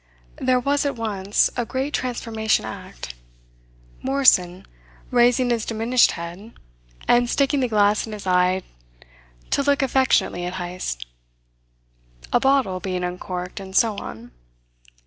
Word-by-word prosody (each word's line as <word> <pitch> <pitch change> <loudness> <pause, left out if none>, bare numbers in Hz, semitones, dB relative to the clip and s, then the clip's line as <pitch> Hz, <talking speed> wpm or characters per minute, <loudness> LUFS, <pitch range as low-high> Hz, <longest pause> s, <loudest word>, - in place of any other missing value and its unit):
There 255 -1 +2
was 280 +3 +1
at 285 -2 -1
once 205 -3 0
a 245 - 0
great 265 +4 -3
transformation 225 -3 -1
act: - - -8 0.9
Morrison 195 -10 +3 0.5
raising 245 0 +3
his 230 -2 0
diminished 230 +3 +2
head, 175 +6 -8 0.5
and 240 0 +4
sticking 280 +2 +2
the 255 - +1
glass 210 -1 +2
in 220 - -7
his 210 -2 -8
eye 180 0 +2 0.9
to - - +2
look 285 0 +2
affectionately 260 -9 +2
at 180 +1 -4
Heyst, 175 - -5 1.3
a - - +5
bottle 260 -9 +2
being 185 -1 -3
uncorked, 180 +1 -5
and 190 -1 -9
so 220 0 +3
on. 120 - -8
220 Hz, 125 wpm, -23 LUFS, 185-255 Hz, 1.3 s, a